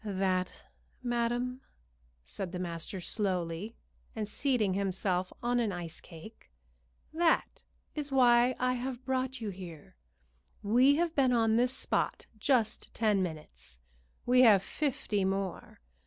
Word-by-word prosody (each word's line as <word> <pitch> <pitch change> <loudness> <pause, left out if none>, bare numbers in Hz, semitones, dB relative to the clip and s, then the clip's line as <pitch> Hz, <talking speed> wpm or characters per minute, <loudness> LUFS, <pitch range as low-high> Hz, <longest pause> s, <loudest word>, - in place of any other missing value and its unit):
"That, 190 -3 -1 0.4
madam," 240 +1 -1 0.6
said 175 - -6
the - - -3
master 175 +1 -4
slowly, 185 +1 -2 0.4
and 215 -2 -3
seating 220 -4 0
himself 185 -1 0
on 245 0 +2
an 225 -4 +1
ice 170 -3 -6
cake 170 - -13 0.6
"that 330 0 +1 0.3
is 295 -2 -3
why 245 -1 +5
I 255 0 +1
have 255 0 -4
brought 260 -1 -1
you 215 -2 -3
here. 175 -5 -10 0.7
We 250 +7 +5
have 335 +1 0
been 265 -4 +3
on 225 -2 +3
this 250 +3 +2
spot - - -1
just 230 -3 +1
ten 210 -4 +2
minutes; 150 - -6 0.5
we 250 +1 +5
have 210 -6 +7
fifty 235 -7 -1
more. 195 -1 -3
220 Hz, 125 wpm, -31 LUFS, 185-250 Hz, 0.7 s, have